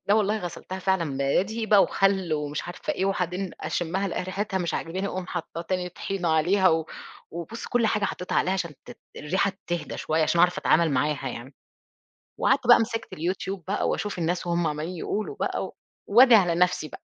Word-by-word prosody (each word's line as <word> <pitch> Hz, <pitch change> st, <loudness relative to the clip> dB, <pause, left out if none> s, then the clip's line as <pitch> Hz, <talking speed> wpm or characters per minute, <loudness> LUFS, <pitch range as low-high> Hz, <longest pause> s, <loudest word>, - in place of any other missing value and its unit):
لا 205 Hz, -, +4 dB
والله 215 Hz, 0 st, +2 dB
غسلتها 185 Hz, +1 st, -6 dB
فعلًا، 180 Hz, -7 st, 0 dB
بدقيق 200 Hz, +11 st, 0 dB
بقى 205 Hz, -2 st, +7 dB
وخَل 190 Hz, -4 st, +1 dB
ومش 150 Hz, 0 st, -2 dB
عارفة 175 Hz, -, -4 dB
إيه 190 Hz, -, -1 dB
وبعدين 185 Hz, -1 st, -1 dB
أشمّها 185 Hz, +3 st, -1 dB
ألاقي 180 Hz, -, -2 dB
ريحتها 190 Hz, +1 st, -2 dB
مش 170 Hz, -2 st, -2 dB
عاجباني 185 Hz, +4 st, -3 dB
أقُوم 185 Hz, -2 st, -4 dB
حاطّة 170 Hz, -1 st, -5 dB
تاني 180 Hz, 0 st, -2 dB
طحينة 180 Hz, 0 st, -3 dB
عليها 180 Hz, +5 st, +4 dB
و 160 Hz, -1 st, +1 dB, 0.4 s
وبُص 170 Hz, +8 st, -6 dB
كلّ 245 Hz, -2 st, +2 dB
حاجة 210 Hz, -2 st, +1 dB
حطّيتها 180 Hz, -, -3 dB
عليها 185 Hz, -, +1 dB
عشان 175 Hz, -4 st, -2 dB
تت -, -, -12 dB, 0.2 s
الريحة 190 Hz, +6 st, 0 dB
تِهدا 175 Hz, -1 st, -3 dB
شويّة 160 Hz, +1 st, 0 dB
عشان 170 Hz, +2 st, +1 dB
اعرف 180 Hz, +1 st, +4 dB
أتعامل 170 Hz, -3 st, +3 dB
معاها 145 Hz, +2 st, 0 dB
يعني. 125 Hz, +4 st, -8 dB, 0.8 s
وقعدت 270 Hz, -2 st, +2 dB
بقى 240 Hz, -, +9 dB
مِسكت 225 Hz, 0 st, -3 dB
اليوتيوب 185 Hz, +2 st, -3 dB
بقى، 205 Hz, -, 0 dB
واشوف 205 Hz, -3 st, -2 dB
الناس 175 Hz, +2 st, 0 dB
بقى 175 Hz, -, -4 dB
وهُم 170 Hz, -1 st, +1 dB
عمّالين 155 Hz, +4 st, -3 dB
يقولوا 210 Hz, +5 st, -3 dB
بقى، -, -, -1 dB
و -, -, -13 dB, 0.3 s
وادعي 235 Hz, +1 st, +7 dB
على 175 Hz, -2 st, +1 dB
نفْسي 175 Hz, -3 st, +1 dB
بقى، -, -, -11 dB
180 Hz, 190 wpm, -26 LUFS, 165-195 Hz, 0.8 s, بقى